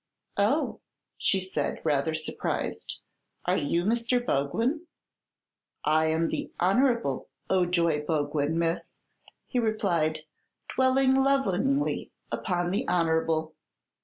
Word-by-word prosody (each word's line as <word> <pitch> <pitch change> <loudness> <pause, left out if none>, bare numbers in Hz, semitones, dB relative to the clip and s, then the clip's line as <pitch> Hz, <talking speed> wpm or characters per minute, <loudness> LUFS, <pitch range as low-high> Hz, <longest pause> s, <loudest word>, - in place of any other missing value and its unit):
"Oh," - - +1 0.4
said 190 -1 0
she, - - -15
rather 155 +1 +1
surprised; 155 0 -3 0.5
"are - - +2
you 170 +4 0
Mr. 235 +4 +2
Boglin?" 235 - 0 1.0
"I 155 +1 +3
am 160 +1 +1
the - - -3
Honer'ble 215 - +2 0.2
Ojoy 170 -4 +2
Boglin, 150 0 0
miss," 165 0 -2 0.5
he 250 - -1
replied, 175 -9 +1 0.5
dwelling 260 0 +4
lovingly 270 0 +1 0.2
upon 175 -3 -1
the 195 - 0
"Honer'ble." 160 -2 +1
175 Hz, 100 wpm, -28 LUFS, 160-235 Hz, 1.0 s, dwelling